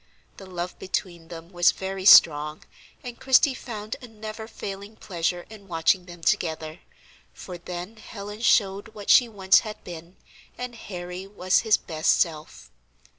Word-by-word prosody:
The 195 - -11
love 180 -1 -6
between 175 -3 -4
them 165 0 -10
was 175 -2 +4
very 190 0 -5
strong, 150 -5 +6 0.4
and 245 -1 -8
Christie 270 +1 +4
found 215 -4 -7
a 250 - -10
never 220 0 -8
failing 200 -1 -8
pleasure 175 -3 -3
in 210 -2 -13
watching 175 +1 +1
them 175 -1 -12
together, 160 -1 -1 0.6
for 180 -2 -9
then 180 +5 -7
Helen 210 0 -9
showed 205 -1 +2
what 205 -1 -1
she 245 -2 +6
once 190 -3 +4
had 215 -1 -8
been, 170 +1 -10 0.4
and 250 -1 -5
Harry 180 -3 -7
was 185 -2 +1
his 220 -2 +3
best 160 -2 +1
self. 155 - -3
190 Hz, 150 wpm, -25 LUFS, 175-215 Hz, 0.6 s, strong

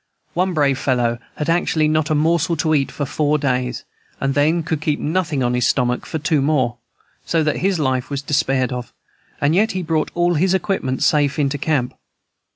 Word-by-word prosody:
One 180 +1 0
brave 140 -3 +2
fellow 120 -3 0 0.2
had 150 - -3
actually 165 -2 +2
not 155 0 +1
a 155 - +2
morsel 165 +2 +2
to 155 0 +1
eat 140 -3 +1
for 145 - -3
four 150 +2 +1
days, 125 -3 -1 0.4
and 135 0 0
then 155 +4 +2
could 155 -2 -2
keep 150 -1 0
nothing 155 -4 -1
on 120 0 +1
his 125 -1 +2
stomach 125 -2 0
for - - -3
two 155 +1 +1
days 135 - 0
more, 130 -6 +1 0.5
so 165 -2 +1
that 150 -1 0
his 195 -1 +1
life 130 -4 -1
was 140 -1 -3
despaired 135 -3 0
of; 125 -2 -6 0.5
and 145 +2 +2
yet 215 +4 +2
he 185 -1 -2
brought 160 -2 0
all 175 0 +2
his 185 +4 +2
equipments 175 -9 -1
safe 145 -2 +2
into 145 -1 0
camp. 135 -4 0
150 Hz, 200 wpm, -20 LUFS, 135-165 Hz, 0.5 s, brave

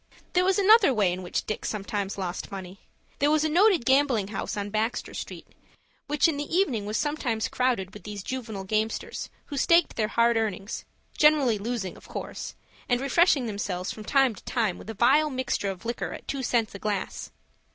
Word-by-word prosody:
There 360 - +4
was 380 +2 +3
another 400 - +6
way 195 -5 +3
in 185 - -5
which 180 - -3
Dick 215 - -4
sometimes 200 -1 -3
lost 185 0 -4
money. 190 -1 -8 0.4
There 285 - +3
was 310 0 +3
a 315 - +1
noted 360 - +4
gambling 265 -7 +3
house 210 - -4
on 205 0 -3
Baxter 220 +3 -1
Street, - - -7 0.6
which 295 +2 +3
in 315 -3 -1
the 290 +3 -3
evening 255 - +1
was 215 +2 -1
sometimes 265 -7 -1
crowded 235 -7 0
with 210 - -10
these 205 -2 -7
juvenile 220 -6 -5
gamesters, 215 +3 -2 0.2
who 285 - -6
staked 335 +5 +3
their 215 -2 +1
hard 235 +1 +3
earnings, 210 -2 -3 0.3
generally 290 -8 +4
losing 215 -3 -3
of - - -16
course, - - -6 0.3
and 245 -1 +3
refreshing 275 0 +3
themselves 200 -4 -3
from 215 - -8
time 270 +1 +3
to - - -14
time 220 -7 -1
with - - -11
a 225 - -5
vile 300 +8 +4
mixture 255 -6 -1
of 190 +2 -7
liquor 235 +1 -3
at - - -10
two 275 - -2
cents 235 -4 0
a 200 - -7
glass. 205 -2 -3
230 Hz, 195 wpm, -27 LUFS, 205-285 Hz, 0.6 s, another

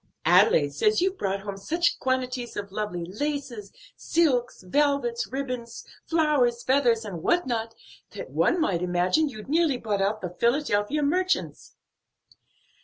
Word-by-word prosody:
Adelaide - - +4
says 430 -1 +2
you've 375 +2 0
brought 195 0 -1
home 200 -1 -6
such 335 - 0
quantities 255 -2 -2
of 200 -1 -5
lovely 195 -4 -4
laces, 240 - -4 0.2
silks, 260 - 0
velvets, 265 +2 0
ribbons, 250 -3 -5 0.2
flowers, 290 -8 +2
feathers 245 -4 +2
and 180 -6 -6
what 350 - +2
not, 225 -2 -3 0.3
that - - -9
one 350 - +2
might 190 - 0
imagine 180 - +1
you'd 215 -5 -10
nearly 310 -2 +2
bought 210 -4 -2
out 205 +2 0
the 180 - -5
Philadelphia 240 +1 +1
merchants." 365 +6 -1
245 Hz, 135 wpm, -26 LUFS, 205-295 Hz, 0.3 s, Adelaide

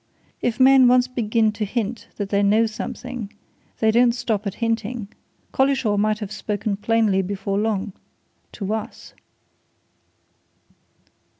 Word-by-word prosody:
If 240 +1 -1
men 260 -1 +7
once 250 0 +4
begin 225 -3 +1
to 210 +1 -4
hint 225 +2 -3
that 205 -2 -3
they 200 0 +2
know 210 +3 +4
something, 230 0 -6 0.5
they 220 -1 +3
don't 235 +1 +4
stop 225 -4 -2
at 195 - -4
hinting. 225 -1 -2 0.4
Collishaw 265 -6 +2
might 215 +1 +1
have 210 -2 -6
spoken 210 -1 -2
plainly 210 -2 +2
before 195 +1 -2
long 210 -2 -1 0.6
to 200 -1 -3
us!" 220 -1 -6
220 Hz, 125 wpm, -22 LUFS, 205-240 Hz, 0.6 s, men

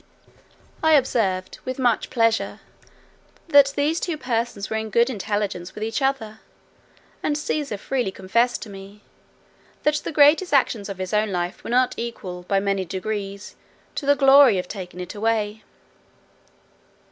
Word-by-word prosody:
I 315 0 +4
observed, 205 -9 +1
with 255 0 -4
much 245 -4 +1
pleasure, 230 -2 +1 0.9
that 285 -3 +6
these 300 +3 +1
two 340 -4 -3
persons 230 -6 -2
were 220 - -2
in 220 0 -4
good 235 +5 +3
intelligence 205 -4 -3
with 210 - -5
each 225 +5 -2
other; 255 -6 -1 0.8
and 295 - 0
Cæsar 295 -6 -2
freely 245 +1 -2
confessed 230 +6 0
to 220 - -10
me, 195 +1 -11 0.8
"that 300 - +3
the - - -5
greatest 295 +3 +5
actions 220 -6 +1
of 195 - -6
his 185 +1 -5
own 210 0 +1
life 175 +1 -3
were - - -7
not 250 +1 +2
equal, 195 -6 -6
by 195 - +2
many 195 -1 0
degrees, 195 +2 -5 0.4
to 280 - -5
the 285 - +5
glory 270 -5 +6
of 180 - -3
taking 180 -3 -8
it 180 0 -6
away." 215 0 -1
220 Hz, 150 wpm, -23 LUFS, 195-270 Hz, 0.9 s, that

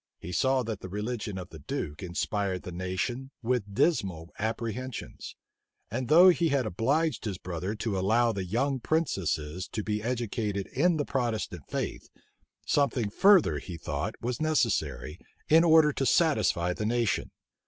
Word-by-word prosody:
He 90 - -8
saw 130 +7 +2
that 110 -3 -4
the 95 - -8
religion 105 0 -4
of 90 -1 -7
the 80 - -11
duke 75 +2 -5
inspired 95 +1 -2
the 90 - -7
nation 95 +9 -3
with 115 -4 -1
dismal 95 - 0
apprehensions; 115 +3 -4 0.6
and 125 +2 -2
though 175 +5 +8
he 170 -2 +3
had 140 -3 +1
obliged 135 - 0
his 100 -4 -3
brother 90 +3 -4
to 105 -3 -2
allow 115 +5 +3
the 100 -3 -3
young 130 +9 0
princesses 90 - -1
to 105 - -4
be 105 0 -2
educated 110 -4 -2
in 165 +5 +3
the 145 - -1
Protestant 110 - -3
faith, - - -4 0.6
something 130 -7 +1
further, 180 - +5
he 85 +2 -8
thought, 80 - -3
was 125 +4 -3
necessary, 100 - 0 0.3
in 160 +2 +7
order 160 -2 +6
to 135 - -1
satisfy 95 - +2
the 105 +3 -3
nation. 115 -2 0
110 Hz, 155 wpm, -28 LUFS, 95-135 Hz, 0.6 s, though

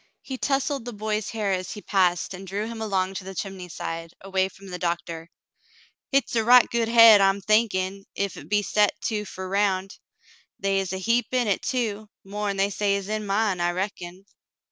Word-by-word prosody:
He 265 - -5
tousled 275 -1 -1
the 245 - -6
boy's 215 0 -2
hair 215 -3 -1
as 185 -1 -2
he 210 - -8
passed 180 -2 +1
and 190 +1 -9
drew 200 +3 -3
him 225 0 -6
along 190 -3 0
to' 190 - -5
the 190 +1 -8
chimney 190 -1 -6
side, 165 0 -6
away 190 0 0
from 195 0 -14
the 180 0 -6
doctor. 170 -1 -3 0.8
"Hit's 275 -3 +1
a 225 - +2
right 245 +1 +7
good 235 -1 0
hade 230 -3 +8
I'm 195 0 +3
thinkin' 195 -2 +1
ef 200 -1 -1
hit - - -11
be 205 0 +2
set 210 0 +2
too 210 -2 -2
fer 190 -1 -7
round. 195 0 0 0.6
They 195 0 +1
is 190 -2 -3
a 190 - -2
heap 230 +4 +1
in 250 -1 +2
hit, 200 -3 0
too, 215 -4 -2
more'n 200 0 -3
they 195 +1 +1 0.2
is 200 0 -4
in 215 -1 -2
mine, 200 -2 +1
I 175 - +2
reckon." 185 0 -5
200 Hz, 195 wpm, -25 LUFS, 190-220 Hz, 0.8 s, hade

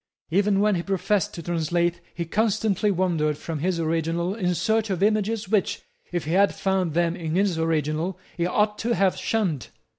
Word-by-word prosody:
Even 200 +2 +3
when 210 0 +3
he 175 - 0
professed 195 0 0
to 170 - -7
translate 170 +1 0
he 170 - -3
constantly 210 +1 +1
wandered 165 -6 +1
from 160 -1 -5
his 175 +2 0
originals 165 +4 -1
in 180 -2 +1
search 220 +2 +1
of 190 -1 0
images 215 0 +1
which, 205 -1 0 0.3
if 175 -3 -2
he 155 - -3
had 195 +3 +3
found 190 -5 0
them 170 0 +2
in 165 -3 -3
his 190 -3 +1
originals, 160 +2 0 0.2
he 175 0 0
ought 210 +3 +1
to 235 +1 0
have 190 0 +2
shunned. 185 - -1
180 Hz, 180 wpm, -25 LUFS, 165-205 Hz, 0.3 s, Even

